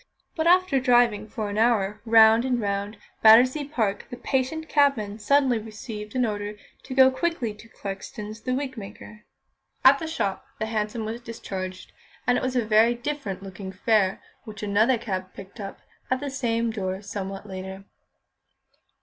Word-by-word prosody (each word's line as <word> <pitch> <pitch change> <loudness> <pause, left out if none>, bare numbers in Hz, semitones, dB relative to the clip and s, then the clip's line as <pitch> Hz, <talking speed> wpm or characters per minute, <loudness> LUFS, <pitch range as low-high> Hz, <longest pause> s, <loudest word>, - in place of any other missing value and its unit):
But 320 0 0
after 360 -5 +4
driving 240 -4 +3
for 215 0 -4
an 205 - -2
hour 215 -3 +2
round 225 0 +6
and 250 -2 0
round 200 0 -2 0.2
Battersea 255 +6 +6
Park, 220 -9 -2
the 245 - -7
patient 270 +6 -1
cabman 250 -9 +2
suddenly 260 +1 +3
received 215 0 -8
an 250 -1 +2
order 205 -1 -3 0.3
to 260 - -6
go 265 0 +7
quickly 260 -6 -2
to 215 +2 -16
Clarkson's, 210 +2 -7
the 255 - -2
wigmaker. 225 -5 -7 0.6
At 275 +1 +8
the 320 - -4
shop, 230 -9 -2
the 220 - -2
hansom 220 0 -2
was 225 +2 -5
discharged, 190 -5 -6 0.3
and 245 - +3
it - - -1
was 255 0 -1
a 245 -3 +1
very 225 +2 +4
different 240 -7 -4
looking 190 0 -8
fare 195 0 +1 0.2
which 215 -1 -9
another 215 +5 +3
cab 190 -5 -5
picked 195 +3 -11
up 195 -1 -6 0.3
at 255 - +1
the 285 0 -4
same 235 -3 0
door 190 -2 -4
somewhat 195 0 -6
later. 190 0 -7
220 Hz, 160 wpm, -25 LUFS, 205-255 Hz, 0.6 s, At